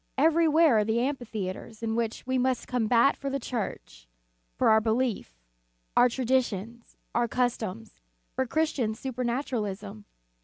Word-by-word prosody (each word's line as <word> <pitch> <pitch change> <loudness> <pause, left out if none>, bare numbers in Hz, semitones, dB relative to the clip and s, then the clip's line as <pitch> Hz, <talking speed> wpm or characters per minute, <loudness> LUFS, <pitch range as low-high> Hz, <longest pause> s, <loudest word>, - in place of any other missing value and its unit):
Everywhere 320 -3 +4
are - - +3
the 220 +2 0
amphitheatres 230 -5 -4
in 225 0 -1
which 230 -1 -2
we 260 0 0
must 255 -1 0
combat 245 +2 +3
for 275 - -4
the 275 0 -2
Church, 220 - -5 0.5
for - - +3
our 220 0 +5
belief, 220 - -1 0.6
our 245 - +6
traditions, 235 -3 -1 0.2
our 240 0 +2
customs, 220 - -2 0.3
for 260 - -1
Chris 315 +5 +1
tian 220 -5 -1
supernaturalism. 230 -5 -3
235 Hz, 130 wpm, -28 LUFS, 220-260 Hz, 0.6 s, our